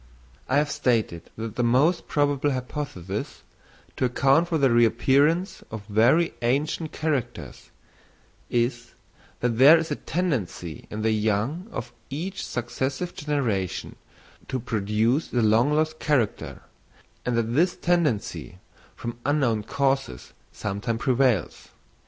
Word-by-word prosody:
I 130 - +3
have 145 0 +1
stated 110 - 0
that 110 -1 -6
the 120 - +1
most 140 +9 +2
probable 145 -1 +1
hypothesis 125 - -5 0.5
to 130 - +1
account 135 +6 +3
for 165 - 0
the 135 -4 +3
reappearance 135 - +3
of 110 -2 -7
very 120 +11 +3
ancient 150 +6 0
characters, 140 -7 -3 0.8
is—that 120 -1 -3
there 145 +5 +9
is 165 0 -3
a - - +1
tendency 120 - -3
in 105 +1 -5
the 110 - +2
young 110 - 0
of 120 - -6 0.2
each 175 +8 -4
successive 130 +8 -3
generation 125 - -2 0.5
to 130 - -2
produce 115 +4 0
the 120 -2 0
long 110 +6 +4
lost 155 +1 0
character, 130 -9 -1 0.6
and 125 -1 -1
that 115 0 0
this 175 +7 +2
tendency, 150 - -1 0.4
from 120 0 -6
unknown 135 -7 +1
causes, 135 - -1 0.2
sometimes 105 +3 -3
prevails. 125 - +1
125 Hz, 120 wpm, -25 LUFS, 110-150 Hz, 0.8 s, there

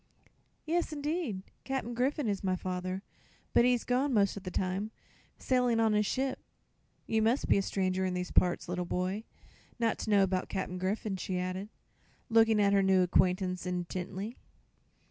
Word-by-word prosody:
"Yes, 335 +1 0
'ndeed; 295 - -2 0.2
Cap'n 265 -3 -3
Griffith 265 +4 0
is 205 -3 -1
my 185 -1 +1
father; 185 +1 -3 0.5
but 235 - +6
he's 245 -1 +3
gone, 255 +1 +1
most 200 -2 +3
of 200 - -6
the 185 - -5
time, 190 +3 -1 0.5
sailin' 250 -3 +2
on 220 -1 +3
his 210 -1 +2
ship. 265 +3 -1 0.7
You 220 0 +1
mus' 230 +5 +2
be - - +4
a - - +2
stranger 190 -1 0
in 185 -1 -1
these 180 0 -3
parts, 180 -1 +2
little 180 0 -2
boy, 185 +5 -2 0.5
not 230 -2 0
to - - -4
know 200 -2 +5
'bout 185 -1 -2
Cap'n 185 -2 -3
Griffith," 190 +1 -2
she 185 0 -2
added, 185 +3 -3 0.6
looking 225 -1 +5
at 200 -1 +4
her 200 - +5
new 190 -1 +4
acquaintance 180 0 +1
intently. 180 +4 -4
200 Hz, 165 wpm, -31 LUFS, 185-230 Hz, 0.7 s, but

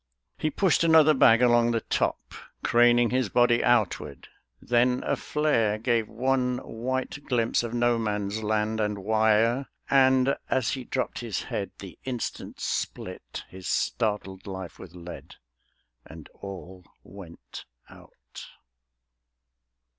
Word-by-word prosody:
He 155 - -1
pushed 175 +2 +2
another 160 -2 +6
bag 120 -3 +5
along 120 -1 +4
the 115 -1 0
top, - - -2 0.3
Craning 120 0 +4
his 130 -4 0
body 120 +1 +3
outward; 110 - 0 0.3
then 125 +1 +1
a - - 0
flare 115 -9 0
Gave 115 -1 0
one 125 +1 0
white 130 +4 -4
glimpse 115 -3 +1
of 120 0 -5
No 120 -1 +2
Man's 105 -1 -2
Land 110 +1 -1
and 105 -1 -1
wire; 110 +4 +2 0.2
And 130 0 +4
as 130 -4 +1
he 130 -2 -4
dropped 130 -1 -3
his 115 -7 -4
head - - -4
the - - -11
instant 125 -3 -5
split - - -4
His 95 -2 -10
startled 105 -2 -2
life 95 -3 -7
with 90 -1 -12
lead, 85 0 -10 0.7
and 80 0 -13
all 95 -1 -10 0.2
went 90 -3 -12 0.2
out. - - -14
115 Hz, 125 wpm, -26 LUFS, 105-125 Hz, 0.7 s, another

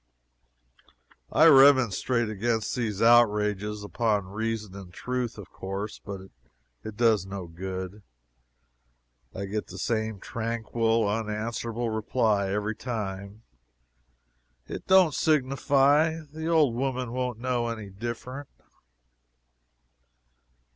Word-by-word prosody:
I 160 - +5
remonstrate 130 - +5
against 110 +2 -1
these 110 -4 -1
outrages 105 -3 +3
upon 105 0 0
reason 110 0 -4
and 95 -3 -10
truth, 125 +4 -3
of 100 -3 -11
course, 100 +2 -6
but 100 -2 -6 0.6
it 110 -1 -8
does 110 -5 +3
no 95 -2 -6
good. 95 +3 -6 1.3
I 100 - -4
get 105 +2 -4
the - - -10
same 110 -2 -2
tranquil, 115 0 -1
unanswerable 115 +2 -2
reply 110 -2 +1
every 105 +2 -1
time: 105 -3 -5 1.2
"It - - -8
don't 190 -5 +6
signify 145 +2 +2
the 160 +1 -5
old 155 -7 +3
woman 130 -1 -2
won't 125 -2 -2
know 120 0 -1
any 110 -4 -5
different." 120 +6 -6
110 Hz, 100 wpm, -27 LUFS, 105-125 Hz, 1.3 s, don't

